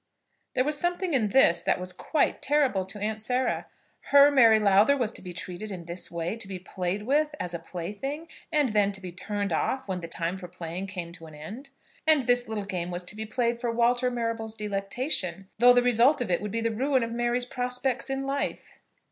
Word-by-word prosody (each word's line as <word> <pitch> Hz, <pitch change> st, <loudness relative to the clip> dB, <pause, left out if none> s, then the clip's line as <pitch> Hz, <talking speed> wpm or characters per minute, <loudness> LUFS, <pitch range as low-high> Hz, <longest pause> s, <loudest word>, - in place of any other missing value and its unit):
There 255 Hz, -, +3 dB
was 295 Hz, +1 st, -1 dB
something 350 Hz, 0 st, -1 dB
in 235 Hz, -6 st, +3 dB
this 185 Hz, -7 st, +5 dB
that -, -, +1 dB
was 180 Hz, 0 st, -5 dB
quite 295 Hz, +10 st, 0 dB
terrible 270 Hz, -10 st, +2 dB
to 195 Hz, +3 st, -7 dB
Aunt 215 Hz, +1 st, -3 dB
Sarah. 250 Hz, +3 st, 0 dB, 0.4 s
Her 285 Hz, +1 st, +7 dB
Mary 230 Hz, -6 st, +6 dB
Lowther 210 Hz, +7 st, +5 dB
was 235 Hz, -5 st, 0 dB
to -, -, -8 dB
be 180 Hz, -, -7 dB
treated 180 Hz, +4 st, -5 dB
in 180 Hz, -4 st, -7 dB
this 170 Hz, +2 st, -4 dB
way; 170 Hz, +3 st, -3 dB
to 230 Hz, -, -7 dB
be 190 Hz, -1 st, -5 dB
played 185 Hz, +2 st, -3 dB
with 295 Hz, +5 st, +1 dB
as 175 Hz, -1 st, -3 dB
a 170 Hz, -, -3 dB
plaything, 205 Hz, -, -5 dB, 0.2 s
and 300 Hz, -4 st, +2 dB
then 205 Hz, -2 st, +2 dB
to 195 Hz, -, -10 dB
be 185 Hz, -2 st, -7 dB
turned 200 Hz, +1 st, -3 dB
off 260 Hz, +10 st, -1 dB
when 185 Hz, -2 st, -2 dB
the 170 Hz, -, -6 dB
time 170 Hz, +3 st, -3 dB
for 180 Hz, -, -8 dB
playing 175 Hz, +1 st, -6 dB
came 180 Hz, -3 st, -6 dB
to 165 Hz, -2 st, -12 dB
an 155 Hz, -, -12 dB
end! 220 Hz, -, -9 dB, 0.4 s
And 310 Hz, -4 st, +5 dB
this 245 Hz, 0 st, +2 dB
little 220 Hz, -2 st, -3 dB
game 180 Hz, -3 st, -3 dB
was 175 Hz, 0 st, -4 dB
to 180 Hz, -, -5 dB
be 220 Hz, 0 st, -5 dB
played 235 Hz, +1 st, -1 dB
for 240 Hz, -, -1 dB
Walter 240 Hz, +2 st, +2 dB
Marrable's 230 Hz, -2 st, -3 dB
delectation, 195 Hz, -, -2 dB
though 245 Hz, +1 st, +8 dB
the 245 Hz, 0 st, +5 dB
result 245 Hz, +4 st, +4 dB
of 245 Hz, -7 st, -2 dB
it 175 Hz, -, +1 dB
would 210 Hz, -, -3 dB
be 230 Hz, +2 st, -1 dB
the 230 Hz, 0 st, 0 dB
ruin 260 Hz, +3 st, +1 dB
of 230 Hz, -, -4 dB
Mary's 240 Hz, +1 st, 0 dB
prospects 250 Hz, +1 st, -2 dB
in 270 Hz, 0 st, -2 dB
life! 275 Hz, +1 st, -3 dB
220 Hz, 220 wpm, -27 LUFS, 185-255 Hz, 0.4 s, though